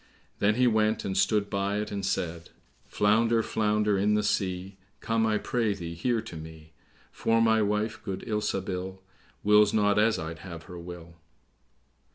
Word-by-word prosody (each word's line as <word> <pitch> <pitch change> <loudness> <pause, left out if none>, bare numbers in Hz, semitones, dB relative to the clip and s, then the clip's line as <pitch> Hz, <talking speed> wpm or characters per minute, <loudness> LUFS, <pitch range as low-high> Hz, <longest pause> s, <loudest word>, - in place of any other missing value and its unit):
Then 105 +1 +3
he 125 +1 +3
went 110 -2 +2
and 95 - -2
stood 100 +2 +2
by 100 0 -1
it, 105 0 -3
and 100 -1 -3
said, 85 -3 -2 0.4
"Flounder, 115 +2 +2
flounder 105 -2 +1
in 105 +2 +2
the 105 - +1
sea, 95 -2 -2 0.2
Come, 115 0 +1
I 110 -1 +2
pray 110 -2 0
thee, 85 -3 -6
here 115 +7 0
to 110 -6 -10
me; 80 0 -11 0.4
For 115 0 +1
my 110 -1 +4
wife, 105 +2 -1
good 95 -3 -5
Ilsabil, 95 -3 -2 0.5
Wills 105 0 +5
not 105 -1 +3
as 110 +1 +3
I'd 80 0 -6
have 85 -2 -9
her 90 +2 -10
will." 85 -1 -10
105 Hz, 165 wpm, -28 LUFS, 95-110 Hz, 0.5 s, Wills